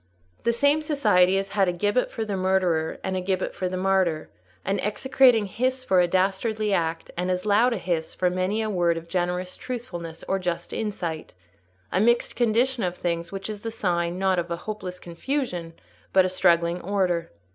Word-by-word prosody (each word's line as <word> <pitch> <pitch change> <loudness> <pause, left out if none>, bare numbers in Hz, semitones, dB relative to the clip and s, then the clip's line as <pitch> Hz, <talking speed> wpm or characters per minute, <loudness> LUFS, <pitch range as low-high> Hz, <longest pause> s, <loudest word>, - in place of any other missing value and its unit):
The 235 - +4
same 285 +6 +3
society 210 - +3
has 195 0 -2
had 200 -2 +2
a - - +2
gibbet 205 +7 0
for 225 - -4
the 205 -2 -2
murderer 185 -4 +1
and 190 0 -2
a 185 - -1
gibbet 185 0 -1
for 185 - -2
the 185 - -3
martyr, 185 -4 +1 0.3
an 195 +1 0
execrating 245 +1 +3
hiss 255 +6 -1
for 190 -7 +3
a 175 - +4
dastardly 200 +4 0
act, 165 -2 -1
and 180 +1 -2
as 180 +1 -1
loud 215 +4 +4
a 235 - 0
hiss 170 -3 -2
for 180 -1 +1
many 185 +4 0
a 215 - -2
word 175 -3 +2
of 165 0 -7
generous 180 +1 -2
truthfulness 175 -10 -6
or 195 - 0
just 175 -2 -3
insight: 175 - -4 0.6
a - - +1
mixed 235 +2 +2
condition 240 +2 +2
of 180 -2 -2
things 170 -1 -2
which 195 0 -5
is 210 -2 -6
the 225 - -3
sign, 175 -5 -1
not 190 -1 +2
of 175 0 -3
hopeless 180 +1 -5
confusion, 175 - -3 0.4
but 190 -1 +6
of 185 - -1
struggling 170 -1 +2
order. 180 -3 0
185 Hz, 190 wpm, -25 LUFS, 175-215 Hz, 0.6 s, but